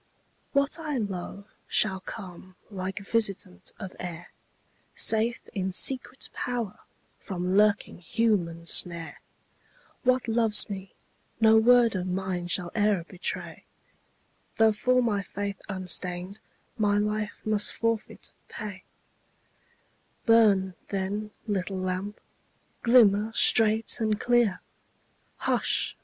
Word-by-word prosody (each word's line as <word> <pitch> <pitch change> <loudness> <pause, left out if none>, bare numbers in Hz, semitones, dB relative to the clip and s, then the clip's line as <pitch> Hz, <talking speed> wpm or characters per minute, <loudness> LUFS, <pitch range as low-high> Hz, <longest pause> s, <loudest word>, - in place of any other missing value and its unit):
What 280 +3 +1
I 305 -4 -3
love 200 -2 -5 0.2
shall 190 -3 +1
come 185 -2 -10 0.2
like 190 -1 -5
visitant 195 -3 -1
of 190 -4 -8
air, 175 -1 -7 0.7
Safe 225 +2 +2
in 190 -2 -2
secret 255 +6 -1
power 235 -5 -3 0.4
from 180 0 -3
lurking 205 -2 +2
human 175 -4 0
snare; 170 -1 0 0.8
What 255 -1 +2
loves 225 -2 +3
me, 195 -1 -7 0.4
no 220 -1 +6
word 235 0 +5
of 185 0 -2
mine 180 -1 -2
shall 175 0 -2
e'er 205 -4 +2
betray, 185 -1 -5 0.9
Though 225 0 +5
for 235 -2 +1
faith 200 0 -5
unstained 185 0 -2 0.4
my 205 -1 +3
life 210 0 -2
must 215 -1 +3
forfeit 230 -1 -3 0.2
pay 205 -4 -7 1.4
Burn, 205 -5 +4
then, 200 +2 -3 0.2
little 195 -3 -2
lamp; 185 +2 -3 0.6
glimmer 225 -3 +5
straight 225 0 +4
and 215 -2 0
clear 240 -6 +2 0.8
Hush! - - 0
205 Hz, 105 wpm, -27 LUFS, 185-225 Hz, 1.4 s, no